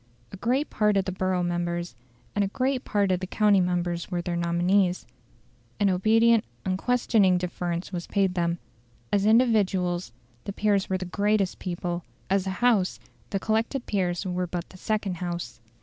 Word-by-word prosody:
A -, -, -8 dB
great 255 Hz, +8 st, 0 dB
part 210 Hz, -1 st, +2 dB
of 195 Hz, -, +1 dB
the 190 Hz, -, -2 dB
borough 185 Hz, -1 st, 0 dB
members 175 Hz, -1 st, -2 dB, 0.4 s
and 205 Hz, -, +2 dB
a -, -, +1 dB
great 255 Hz, +5 st, -1 dB
part 200 Hz, -2 st, +1 dB
of 180 Hz, -, +1 dB
the 185 Hz, -, -5 dB
county 205 Hz, -1 st, +3 dB
members 175 Hz, -1 st, -1 dB
were 180 Hz, -2 st, -1 dB
their 175 Hz, 0 st, -2 dB
nominees; 175 Hz, +2 st, +1 dB, 0.7 s
an 200 Hz, -2 st, +3 dB
obedient, 225 Hz, +4 st, +4 dB, 0.2 s
unquestioning 195 Hz, -1 st, +2 dB
deference 175 Hz, 0 st, -3 dB
was 175 Hz, -1 st, -4 dB
paid 195 Hz, -2 st, +1 dB
them. 170 Hz, -1 st, 0 dB, 0.6 s
As 205 Hz, 0 st, +3 dB
individuals 195 Hz, -, +2 dB, 0.3 s
the 200 Hz, -, -4 dB
peers 205 Hz, -1 st, +1 dB
were 190 Hz, -, +1 dB
the 185 Hz, -, -5 dB
greatest 200 Hz, +1 st, 0 dB
people; 175 Hz, -1 st, -3 dB, 0.3 s
as 195 Hz, -1 st, +2 dB
a 190 Hz, +4 st, -4 dB
House 210 Hz, -7 st, +3 dB, 0.3 s
the 195 Hz, -, -1 dB
collected 225 Hz, +5 st, -1 dB
peers 180 Hz, -2 st, -1 dB
were 180 Hz, -1 st, -1 dB
but 175 Hz, 0 st, -4 dB
the 185 Hz, -, -13 dB
second 205 Hz, -2 st, -2 dB
House. 170 Hz, -10 st, -5 dB
185 Hz, 165 wpm, -26 LUFS, 175-210 Hz, 0.7 s, obedient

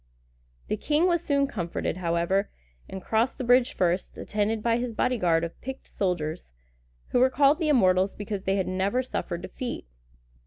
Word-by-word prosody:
The -, -, -1 dB
king 305 Hz, +3 st, +1 dB
was 345 Hz, -2 st, +2 dB
soon 280 Hz, -3 st, +2 dB
comforted, 175 Hz, -9 st, -3 dB
however, 175 Hz, +3 st, 0 dB, 0.4 s
and 190 Hz, -1 st, -7 dB
crossed 225 Hz, +3 st, +1 dB
the 260 Hz, -, -4 dB
bridge 245 Hz, +1 st, +4 dB
first, 180 Hz, +1 st, 0 dB
attended 215 Hz, +1 st, -1 dB
by 230 Hz, -1 st, +2 dB
his 245 Hz, -1 st, -3 dB
bodyguard 180 Hz, -11 st, +2 dB
of 170 Hz, -, -6 dB
picked 265 Hz, +1 st, -7 dB
soldiers, 175 Hz, -, -3 dB, 0.6 s
who -, -, +2 dB
were 260 Hz, +1 st, +5 dB
called 280 Hz, +3 st, +4 dB
the 320 Hz, -3 st, 0 dB
Immortals 190 Hz, -7 st, +4 dB
because 205 Hz, -2 st, -5 dB
they 195 Hz, -, +2 dB
had 190 Hz, -2 st, 0 dB
never 195 Hz, +7 st, 0 dB
suffered 175 Hz, -8 st, -4 dB
defeat. 250 Hz, -2 st, -5 dB
210 Hz, 165 wpm, -26 LUFS, 185-255 Hz, 0.6 s, were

